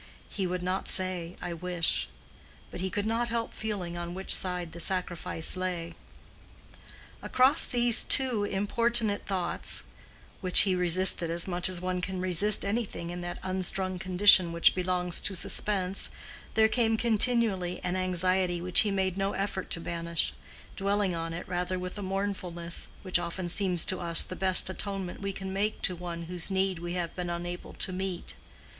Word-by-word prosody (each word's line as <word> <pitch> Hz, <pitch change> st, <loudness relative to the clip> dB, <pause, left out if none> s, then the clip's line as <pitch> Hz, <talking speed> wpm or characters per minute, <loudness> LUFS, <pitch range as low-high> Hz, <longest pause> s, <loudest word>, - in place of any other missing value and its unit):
—he 195 Hz, -2 st, -3 dB
would 180 Hz, 0 st, -4 dB
not 185 Hz, +1 st, -3 dB
say 185 Hz, -2 st, -3 dB
"I 175 Hz, -1 st, -5 dB
wish"; 175 Hz, 0 st, -1 dB, 0.6 s
but -, -, -7 dB
he 190 Hz, -, -2 dB
could 205 Hz, +2 st, -4 dB
not 230 Hz, +2 st, -2 dB
help 230 Hz, 0 st, -4 dB
feeling 195 Hz, -6 st, -5 dB
on 175 Hz, 0 st, -6 dB
which 190 Hz, 0 st, 0 dB
side 180 Hz, -2 st, 0 dB
the 170 Hz, -, -10 dB
sacrifice 175 Hz, -2 st, +1 dB
lay. 180 Hz, -2 st, -5 dB, 1.3 s
Across 265 Hz, +5 st, +5 dB
these 240 Hz, -1 st, +7 dB
two 255 Hz, -6 st, +4 dB
importunate 205 Hz, +2 st, 0 dB
thoughts, 185 Hz, -3 st, -1 dB, 0.6 s
which 185 Hz, -2 st, +8 dB
he 195 Hz, -2 st, +2 dB
resisted 180 Hz, -1 st, +4 dB
as 170 Hz, +2 st, -1 dB
much 175 Hz, 0 st, +1 dB
as 180 Hz, -2 st, -2 dB
one 185 Hz, 0 st, -3 dB
can 185 Hz, 0 st, -5 dB
resist 185 Hz, +4 st, +3 dB
anything 200 Hz, -5 st, -4 dB
in 175 Hz, 0 st, -7 dB
that 175 Hz, 0 st, -6 dB
unstrung 185 Hz, 0 st, -2 dB
condition 185 Hz, -2 st, +5 dB
which 170 Hz, 0 st, +3 dB
belongs 180 Hz, -1 st, -1 dB
to 195 Hz, -, -2 dB
suspense, 190 Hz, +1 st, 0 dB, 0.5 s
there 220 Hz, 0 st, +4 dB
came 225 Hz, -1 st, 0 dB
continually 220 Hz, -5 st, +1 dB
an 180 Hz, 0 st, -2 dB
anxiety 185 Hz, -1 st, 0 dB
which 180 Hz, 0 st, +5 dB
he 215 Hz, -, +4 dB
made 190 Hz, -1 st, -2 dB
no 195 Hz, +1 st, -2 dB
effort 195 Hz, -1 st, -4 dB
to -, -, -1 dB
banish—dwelling 175 Hz, +4 st, -3 dB
on 165 Hz, 0 st, -5 dB
it 170 Hz, +3 st, -7 dB
rather 180 Hz, 0 st, -3 dB
with 180 Hz, 0 st, -7 dB
a -, -, -6 dB
mournfulness, 185 Hz, -3 st, -4 dB, 0.2 s
which 185 Hz, -2 st, +1 dB
often 175 Hz, +1 st, -5 dB
seems 180 Hz, -1 st, 0 dB
to 185 Hz, -, 0 dB
us 170 Hz, -2 st, +2 dB
the 185 Hz, -, -8 dB
best 185 Hz, 0 st, +5 dB
atonement 190 Hz, -1 st, -6 dB
we 200 Hz, 0 st, -4 dB
can 190 Hz, 0 st, -7 dB
make 205 Hz, +2 st, -2 dB
to 180 Hz, -, -1 dB
one 170 Hz, -1 st, -7 dB
whose 175 Hz, +1 st, -3 dB
need 190 Hz, -2 st, -1 dB
we 175 Hz, 0 st, -6 dB
have 175 Hz, -2 st, -5 dB
been 180 Hz, -1 st, -5 dB
unable 175 Hz, +1 st, -7 dB
to 185 Hz, -, -2 dB
meet. 185 Hz, -1 st, -5 dB
185 Hz, 165 wpm, -27 LUFS, 175-195 Hz, 1.3 s, which